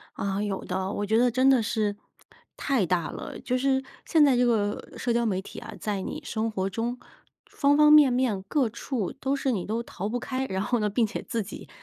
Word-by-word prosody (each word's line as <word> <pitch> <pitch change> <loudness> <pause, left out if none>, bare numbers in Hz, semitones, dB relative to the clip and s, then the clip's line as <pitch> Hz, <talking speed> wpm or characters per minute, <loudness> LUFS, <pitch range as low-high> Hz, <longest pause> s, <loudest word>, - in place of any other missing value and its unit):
啊， 195 0 -2
有 205 -2 -3
的， 190 +1 -2
我 205 - -2
觉 220 +2 +2
得 245 +1 +4
真 260 +3 +4
得 260 -3 +5
是 210 -1 -1 0.6
太 265 -9 +1
大 175 -1 0
了。 - - -7
就 250 - -1
是 265 0 +1 0.2
现 315 -2 +4
在 275 -3 +5
这 245 0 +3
个 210 -4 0
社 240 - 0
交 235 0 +1
媒 190 -4 0
体 - - -9
啊， - - -9
在 205 -2 -2
你 - - -5
生 225 0 -1
活 190 -2 -1
中， 235 +5 -3 0.5
方 285 +1 +2
方 300 0 +7
面 295 -4 +8
面 245 -6 +1
各 250 +3 +1
处 235 -3 -3
都 270 +1 -1
是 270 -1 0
你 195 -6 -2
都 225 +3 -2
逃 200 -2 -5
不 245 +2 -2
开， 260 +1 -3
然 190 -3 -2
后 240 +3 0
呢， 210 -1 +1
并 225 +3 +2
且 210 - -5
自 230 - -1
己 - - -10
230 Hz, 245 characters per minute, -26 LUFS, 205-260 Hz, 0.6 s, 面